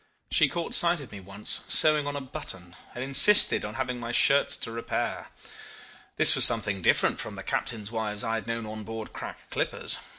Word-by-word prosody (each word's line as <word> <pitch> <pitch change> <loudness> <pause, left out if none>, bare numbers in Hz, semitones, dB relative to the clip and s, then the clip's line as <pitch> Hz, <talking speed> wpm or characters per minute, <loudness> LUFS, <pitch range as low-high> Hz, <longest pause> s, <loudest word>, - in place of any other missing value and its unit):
She - - +3
caught 170 -1 -6
sight 170 -1 +3
of 140 - -12
me 100 - -10
once, 100 +2 -3
sewing 150 -2 +3
on 145 - -5
a 145 - -5
button, 90 -8 -8 0.2
and 125 - -6
insisted 140 +10 +6
on 105 +1 -8
having 125 -1 -5
my 115 0 -7
shirts 140 +3 +3
to 115 - -6
repair. 115 0 -5 0.9
This - - +8
was - - +4
something 105 -4 +2
different - - 0
from - - -7
the - - -10
captains' 110 -2 -5
wives 110 -1 -4
I 115 -1 -3
had 115 0 -5
known 115 -1 -5
on 110 0 -9
board 110 +1 -9
crack - - -11
clippers. - - -2
115 Hz, 195 wpm, -25 LUFS, 105-135 Hz, 0.9 s, This